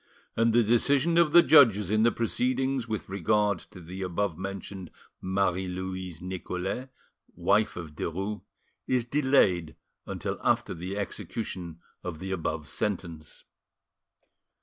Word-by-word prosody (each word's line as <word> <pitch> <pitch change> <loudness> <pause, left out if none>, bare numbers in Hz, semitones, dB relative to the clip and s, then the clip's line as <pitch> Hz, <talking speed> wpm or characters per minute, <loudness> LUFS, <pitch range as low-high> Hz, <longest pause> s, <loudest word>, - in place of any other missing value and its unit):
And 115 0 +3
the 120 +1 +4
decision 140 +9 +3
of 165 -3 +4
the 175 +2 +8
judges 110 - +6
in 110 0 +3
the 115 +1 +5
proceedings 130 +2 0
with 110 -2 -4
regard 100 +1 +1
to - - -12
the 90 +3 -8
above 95 0 -1
mentioned 95 0 -6 0.3
Marie 95 -1 0
Louise 95 -2 -5
Nicolais, 95 +6 -4 0.5
wife 100 +5 +2
of 80 -3 -7
Derues, 95 +7 -3 0.5
is 125 -2 +1
delayed 120 - +2 0.3
until - - -4
after - - +1
the 90 +4 -5
execution 90 -4 -5 0.2
of 90 -3 -5
the 95 +4 -6
above 80 -4 -3
sentence. 85 -7 -4
95 Hz, 125 wpm, -28 LUFS, 90-115 Hz, 0.5 s, the